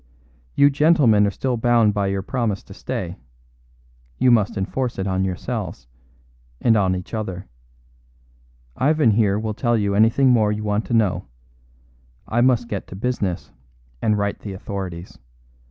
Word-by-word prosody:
You 140 Hz, 0 st, +5 dB
gentlemen 140 Hz, -9 st, +4 dB
are -, -, +1 dB
still 125 Hz, +4 st, -2 dB
bound 115 Hz, -2 st, +3 dB
by 100 Hz, -1 st, 0 dB
your 95 Hz, 0 st, -2 dB
promise 110 Hz, -3 st, -2 dB
to -, -, -13 dB
stay; -, -, -5 dB, 1.0 s
you 125 Hz, -, +4 dB
must 110 Hz, -2 st, +2 dB
enforce 120 Hz, +6 st, -2 dB
it 95 Hz, -, -2 dB
on 95 Hz, -1 st, 0 dB
yourselves 95 Hz, -, -4 dB, 0.7 s
and 115 Hz, -, +3 dB
on 95 Hz, -3 st, +2 dB
each 90 Hz, +4 st, -8 dB
other. 95 Hz, -5 st, -4 dB, 1.3 s
Ivan 150 Hz, -4 st, +3 dB
here 105 Hz, -2 st, +2 dB
will 110 Hz, 0 st, -3 dB
tell 120 Hz, +1 st, +1 dB
you 100 Hz, -2 st, 0 dB
anything 115 Hz, +6 st, +4 dB
more 110 Hz, -4 st, +3 dB
you 105 Hz, 0 st, -3 dB
want 105 Hz, +1 st, -1 dB
to 120 Hz, -, -1 dB
know; 95 Hz, -7 st, +1 dB, 1.0 s
I 120 Hz, +2 st, +1 dB
must 120 Hz, -2 st, +3 dB
get 100 Hz, -4 st, -5 dB
to -, -, -9 dB
business 100 Hz, -5 st, -3 dB, 0.5 s
and 105 Hz, -1 st, +2 dB
write 100 Hz, 0 st, -2 dB
to -, -, -23 dB
the 100 Hz, -, -5 dB
authorities. 95 Hz, -2 st, -7 dB
105 Hz, 155 wpm, -22 LUFS, 100-120 Hz, 1.3 s, You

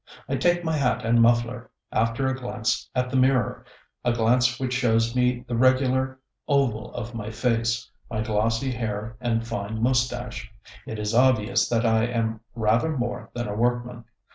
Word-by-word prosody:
I -, -, -1 dB
take 175 Hz, 0 st, +2 dB
my 160 Hz, -1 st, 0 dB
hat 125 Hz, -4 st, 0 dB
and 115 Hz, +1 st, +4 dB
muffler, 120 Hz, +1 st, +2 dB, 0.2 s
after 115 Hz, +4 st, 0 dB
a 130 Hz, 0 st, +1 dB
glance 125 Hz, -1 st, -2 dB
at 125 Hz, 0 st, 0 dB
the -, -, -2 dB
mirror 130 Hz, -3 st, +2 dB, 0.4 s
a 120 Hz, -, +2 dB
glance 120 Hz, +2 st, +2 dB
which 130 Hz, -1 st, -2 dB
shows 115 Hz, -2 st, +2 dB
me 125 Hz, 0 st, +1 dB
the 120 Hz, -, -2 dB
regular 130 Hz, +1 st, +2 dB, 0.3 s
oval 135 Hz, -7 st, +1 dB
of 120 Hz, 0 st, -5 dB
my 110 Hz, -2 st, -5 dB
face, 115 Hz, 0 st, 0 dB, 0.2 s
my 110 Hz, -2 st, -2 dB
glossy 115 Hz, +4 st, 0 dB
hair 110 Hz, -2 st, -4 dB
and 115 Hz, -2 st, 0 dB
fine 110 Hz, -1 st, -4 dB
mustache. 120 Hz, -2 st, -1 dB, 0.4 s
(It 110 Hz, -, -5 dB
is 105 Hz, +1 st, -2 dB
obvious 120 Hz, -3 st, +3 dB
that 115 Hz, 0 st, +1 dB
I 110 Hz, 0 st, +3 dB
am 115 Hz, -2 st, -1 dB, 0.2 s
rather 115 Hz, +7 st, +1 dB
more 120 Hz, -1 st, -3 dB
than 120 Hz, -2 st, -2 dB
a 105 Hz, -, -3 dB
workman.) 120 Hz, +1 st, -1 dB
120 Hz, 165 wpm, -25 LUFS, 115-125 Hz, 0.4 s, and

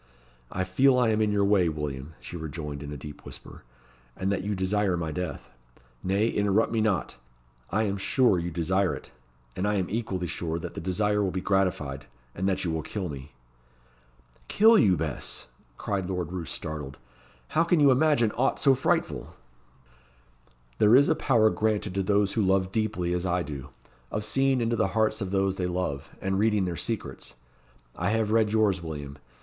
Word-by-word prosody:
"I 95 Hz, -, -1 dB
feel 125 Hz, +8 st, +3 dB
I 125 Hz, -2 st, +3 dB
am 110 Hz, 0 st, +2 dB
in 105 Hz, -1 st, +2 dB
your 100 Hz, -1 st, +2 dB
way, 100 Hz, -4 st, +3 dB
William," 75 Hz, -1 st, -5 dB
she -, -, -8 dB
rejoined, 75 Hz, -3 st, -5 dB
in 70 Hz, 0 st, -7 dB
a 75 Hz, -, -5 dB
deep 75 Hz, +2 st, -10 dB
whisper; -, -, -10 dB, 0.6 s
"and 95 Hz, +1 st, -1 dB
that 95 Hz, -1 st, -1 dB
you 105 Hz, +1 st, -1 dB
desire 95 Hz, 0 st, +1 dB
my 80 Hz, -2 st, -3 dB
death. 80 Hz, -3 st, -5 dB, 0.5 s
Nay, 100 Hz, +4 st, +2 dB
interrupt 105 Hz, +2 st, +2 dB
me 115 Hz, -1 st, +1 dB
not; 105 Hz, -4 st, 0 dB, 0.5 s
I 110 Hz, +4 st, +1 dB
am 100 Hz, -2 st, -1 dB
sure 105 Hz, -1 st, +3 dB
you 85 Hz, +1 st, -3 dB
desire 90 Hz, +3 st, 0 dB
it; -, -, -11 dB, 0.4 s
and 95 Hz, -, -1 dB
I 105 Hz, -, +1 dB
am 95 Hz, -3 st, 0 dB
equally 100 Hz, -5 st, -2 dB
sure 85 Hz, -1 st, -3 dB
that 85 Hz, -, -6 dB
the -, -, -6 dB
desire 105 Hz, +4 st, +1 dB
will 95 Hz, -, +1 dB
be 95 Hz, -, -3 dB
gratified, 90 Hz, -8 st, -1 dB, 0.3 s
and 95 Hz, +2 st, -1 dB
that 95 Hz, 0 st, -1 dB
you 85 Hz, -, 0 dB
will 80 Hz, 0 st, -1 dB
kill 95 Hz, +3 st, -4 dB
me." 70 Hz, 0 st, -8 dB, 1.1 s
"Kill 225 Hz, +2 st, +6 dB
you, 95 Hz, -, +5 dB
Bess!" 75 Hz, -3 st, -3 dB, 0.3 s
cried 95 Hz, -3 st, -2 dB
Lord 90 Hz, -3 st, -3 dB
Roos, 90 Hz, -3 st, -5 dB
startled. 75 Hz, -3 st, -6 dB, 0.5 s
"How 160 Hz, -, +3 dB
can 170 Hz, 0 st, +2 dB
you 145 Hz, -2 st, +6 dB
imagine 130 Hz, -5 st, +3 dB
aught 130 Hz, +5 st, +1 dB
so 135 Hz, -, +5 dB
frightful?" 130 Hz, -, -1 dB, 1.4 s
"There 105 Hz, +3 st, +6 dB
is 140 Hz, +3 st, +6 dB
a 160 Hz, -, +3 dB
power 115 Hz, -7 st, +3 dB
granted 105 Hz, -3 st, 0 dB
to 100 Hz, -, 0 dB
those 100 Hz, +1 st, +2 dB
who 110 Hz, -, +1 dB
love 95 Hz, -1 st, +2 dB
deeply 100 Hz, -5 st, -1 dB
as 90 Hz, +1 st, -1 dB
I 90 Hz, 0 st, +1 dB
do, 70 Hz, -3 st, -7 dB, 0.4 s
of 105 Hz, -, -3 dB
seeing 135 Hz, -1 st, +2 dB
into 115 Hz, 0 st, +1 dB
the 95 Hz, -1 st, 0 dB
hearts 110 Hz, 0 st, +2 dB
of 95 Hz, -, -2 dB
those 95 Hz, 0 st, 0 dB
they 90 Hz, -, -1 dB
love, 90 Hz, -6 st, -3 dB
and 95 Hz, 0 st, -1 dB
reading 105 Hz, -2 st, +2 dB
their 90 Hz, -1 st, -2 dB
secrets. -, -, -5 dB, 0.6 s
I 90 Hz, +3 st, -1 dB
have 110 Hz, -1 st, +1 dB
read 110 Hz, -2 st, +3 dB
yours, 105 Hz, -4 st, +2 dB
William. 75 Hz, -3 st, -7 dB
95 Hz, 190 wpm, -27 LUFS, 85-110 Hz, 1.4 s, Kill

